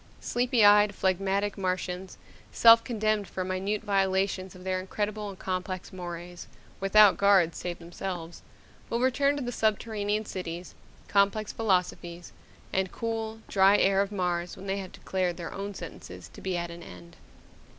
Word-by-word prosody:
Sleepy 240 -2 +2
eyed, 205 0 +6
phlegmatic 195 +2 0
Martians, 185 0 -3 0.3
self 230 0 +7
condemned 215 -4 0
for 185 - -4
minute 190 +3 -2
violations 195 -2 0
of 180 - -12
their 185 0 -1
incredible 205 +2 -3
and 195 - -9
complex 185 0 -4
mores 175 -1 -7 0.3
without 195 -1 +6
guards 190 -5 +4
save 175 -1 -4
themselves 175 0 -6 0.5
will 235 - -1
return 280 +3 +2
to 280 - -3
the 245 - -3
subterranean 215 -1 -1
cities, 180 -2 -6 0.3
complex 200 +1 +1
philosophies, 180 -4 -1 0.4
and 190 -1 0
cool, 225 -1 -4
dry 195 +1 +5
air 195 0 +3
of 200 0 -2
Mars 180 -3 -2
when 190 - -10
they 195 0 -1
have 190 -1 -7
declared 180 -2 -2
their 170 -2 -6
own 200 0 -5
sentences - - -9
to - - -12
be 185 -2 -2
at 170 0 -4
an 170 0 -9
end. 85 - -12
195 Hz, 150 wpm, -28 LUFS, 180-210 Hz, 0.5 s, self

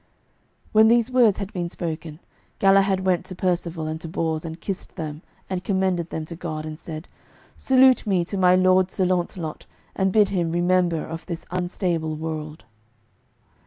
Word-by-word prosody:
When 220 +1 +6
these 235 +1 +3
words 240 -6 +4
had 200 +1 -5
been 175 -3 -3
spoken, 160 -2 -5 0.4
Galahad 195 -1 +4
went 180 -2 +2
to 185 - -7
Percivale 170 -3 -1
and 155 +1 -4
to 165 - -7
Bors 160 -1 -2
and 165 0 -7
kissed 195 -2 -6
them 155 -3 -5 0.3
and 185 -1 -3
commended 185 -3 0
them 160 - -4
to 170 - -7
God, 155 -2 -5
and 155 0 -7
said, 160 -1 -7 0.5
"Salute 260 -2 +4
me 185 -4 +2
to 200 - -5
my 185 -1 +5
lord 185 0 +4
Sir 185 - 0
Launcelot, 175 -3 -2 0.3
and 190 -1 +1
bid 210 -1 +4
him 175 -4 0
remember 175 -1 +1
of 165 +1 -7
this 170 -2 -5
unstable 175 -3 -1
world." 155 -1 -6
175 Hz, 165 wpm, -23 LUFS, 160-190 Hz, 0.5 s, When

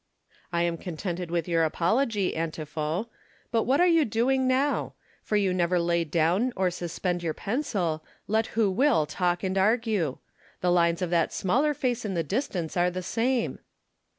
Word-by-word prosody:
" - - -31
I 170 0 +1
am 170 -1 -1
contented 175 0 -4
with 170 -1 -1
your 165 -1 +2
apology, 205 - +1
Antipho; 160 +2 -3 0.5
but 230 -2 +1
what 270 +3 +2
are 355 - +6
you 330 -3 +5
doing 260 +3 +1
now 270 +3 +2
1 - - -13 0.3
for 215 - -2
you 195 -3 +2
never 180 0 +1
lay 170 0 +1
down 170 - +1
or 185 -1 +1
suspend 175 0 -3
your 165 -2 -2
pencil, 195 - -2 0.2
let 220 +2 +1
who 215 -4 +3
will 230 - +3
talk 175 +3 -1
and 190 0 -1
argue. 210 - +1 0.4
The 180 - +2
lines 170 0 +2
of 175 - -2
that 170 -2 +2
smaller 275 +11 +1
face 245 -2 -1
in 200 -4 -3
the 165 - 0
distance 185 - -2
are 175 0 +3
the 180 +1 -5
same." 235 +5 0
185 Hz, 180 wpm, -27 LUFS, 170-230 Hz, 0.5 s, are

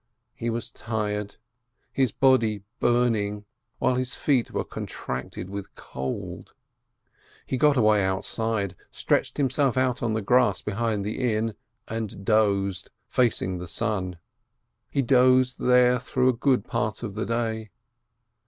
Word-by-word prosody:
He 120 - -3
was 115 +1 -3
tired, 105 -2 -3 0.6
his 130 -4 +2
body 115 -6 +3 0.2
burning, 110 -4 +1 0.3
while - - +2
his 125 0 -2
feet 130 -5 +1
were - - -2
contracted 65 +7 -6
with 100 0 -7
cold. 65 0 -6 0.9
He - - -2
got 145 +1 +4
away 110 -3 +4
outside, 100 +1 -1
stretched - - 0
himself 135 -1 +1
out 130 -2 +1
on 110 -2 0
the 110 - -2
grass 120 -3 +3
behind 105 -1 -1
the 120 +3 0
inn 110 +1 -1 0.3
and 110 -3 -5
dozed, 100 -3 +1 0.2
facing 100 -7 +1
the 90 - -6
sun. 95 -1 -2 0.7
He 140 - 0
dozed 130 0 +4
there 125 0 +4
through 130 0 +1
a - - +3
good 130 +2 +1
part 110 -1 -2
of 105 -4 -4
the 110 +2 -3
day. 110 -2 -2
115 Hz, 135 wpm, -26 LUFS, 105-125 Hz, 0.9 s, got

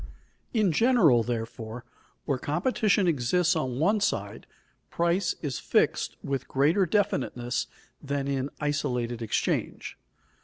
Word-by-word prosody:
In 215 -6 +2
general, 180 - +4
therefore, 115 0 -5 0.4
where 140 -4 -1
competition 200 - +1
exists 170 +4 +2
on 130 -6 -2
one 205 +9 +2
side, 200 - -2 0.4
price 170 +2 +1
is 140 -4 -2
fixed - - +1
with 135 -1 -3
greater 160 +8 +2
definiteness 130 - 0 0.3
than 140 -1 -2
in 135 0 -1
isolated 125 -6 -1
exchange. 115 - -2
145 Hz, 110 wpm, -27 LUFS, 125-180 Hz, 0.4 s, general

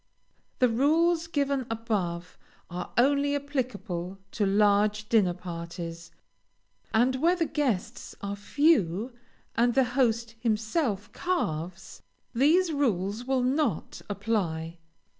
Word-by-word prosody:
The 250 - +4
rules 320 +7 +2
given 280 -5 0
above 200 -7 -2 0.4
are 180 0 -5
only 285 +3 +3
applicable 230 -10 -3
to 210 - 0
large 210 +1 +3
dinner 195 -6 +3
parties, 170 -1 -7 0.8
and 245 +4 +3
where 335 +6 +3
the 340 -2 0
guests 265 -12 -2
are 200 0 -4
few, 225 - +2 0.4
and 240 +1 +2
the 265 - +5
host 235 -3 +1
himself 220 - -1
carves, 175 - -3 0.3
these 320 +8 +4
rules 220 -5 0
will 260 -1 +1
not 260 - -1
apply. 175 -6 -2
225 Hz, 105 wpm, -28 LUFS, 190-275 Hz, 0.8 s, the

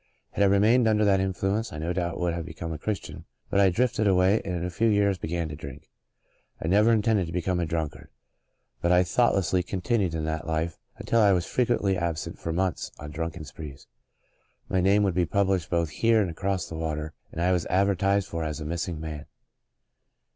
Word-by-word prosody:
Had - - -3
I - - +6
remained 110 +5 +4
under 105 -1 +3
that 100 -2 +4
influence 95 +3 -1
I 75 - -7
no 80 +3 -2
doubt 85 -2 -2
would 90 -1 0
have 85 0 -3
become 80 0 -6
a 75 - -6
Christian 105 +3 -5 0.3
but 100 - +3
I 100 -1 +6
drifted 110 +2 +1
away 95 +2 +4
and 90 -2 -3
in 85 0 -2
a 90 - -3
few 115 +6 +1
years 100 -3 +2
began 85 0 -2
to 75 - -6
drink. 70 -1 -10 0.7
I - - -4
never 105 +6 +4
intended 105 -4 +2
to - - -7
become 90 +1 -1
a 85 - -1
drunkard, 80 -3 -4 0.7
but 85 - +2
I 90 0 +5
thoughtlessly 95 -2 +2
con 90 +1 -5
tinued 95 -6 0
in 80 -1 -2
that 80 0 -3
life 80 0 -2 0.2
until 115 - +1
I 105 - +6
w^as 90 -3 +2
frequently 110 -6 +1
ab 85 -2 -1
sent - - -6
for 85 - -3
months 90 +1 -1
on 75 0 -8
drunken 80 +1 -4
sprees. 75 -1 -10 0.8
My 95 - +1
name 100 +3 +4
w^ould 95 -3 +1
be 90 -2 +1
published 95 -2 +1
both 85 -3 0
here 115 +4 +3
and 95 -5 0
across 95 +2 -2
the - - -9
water 80 -1 -3 0.2
and - - -7
I 90 +2 +2
was 90 -3 0
advertised 100 +1 +2
for 85 -1 -4
as 75 -1 -3
a 75 - -6
missing 85 +1 -3
man. 75 -2 -6
90 Hz, 210 wpm, -26 LUFS, 80-100 Hz, 0.8 s, I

